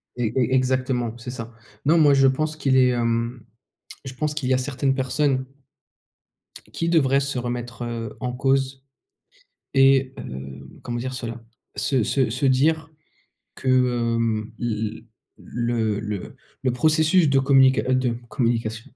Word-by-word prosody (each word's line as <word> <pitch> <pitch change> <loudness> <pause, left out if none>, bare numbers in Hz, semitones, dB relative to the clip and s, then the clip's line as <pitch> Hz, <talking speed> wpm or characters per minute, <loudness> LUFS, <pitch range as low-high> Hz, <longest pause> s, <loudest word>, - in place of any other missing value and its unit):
E 120 -3 -1
e 130 0 +1
exactement, 130 -2 0
c'est 120 +1 -7
ça. 115 -2 -8 0.3
Non, 160 +4 +4
moi, 150 -3 +6
je 135 -1 +5
pense 155 +4 0
qu'il 135 -4 +1
est, 130 -1 +5
hem, 115 0 -1 0.6
je 135 -1 -7
pense 150 +3 -2
qu'il 145 -4 -2
y 130 - +3
a - - +2
certaines 135 +1 -1
personnes 130 0 0 1.3
qui 165 - -1
devraient 140 -5 +3
se 140 -1 -2
remettre, 120 0 -5
heu, 115 -2 -5
en 125 -1 -3
cause 135 0 0 0.9
et 135 -1 +4
heu, 65 +1 -8
comment 120 -1 -4
dire 130 +2 -4
cela? 120 -1 -6 0.3
Se 130 +4 +1
se 130 +2 +1
se 130 +4 0
dire 155 +4 +2 0.7
que, - - -7
hem, 115 -3 +1
l 120 - -2
l 110 0 -4 0.6
le 110 -3 0
le 105 -3 -5 0.3
le 130 - +2
processus 155 +5 +3
de 135 0 +4
communica 135 -1 +4
de 130 -2 +1
communication 115 -2 -2
130 Hz, 150 wpm, -23 LUFS, 115-135 Hz, 1.3 s, moi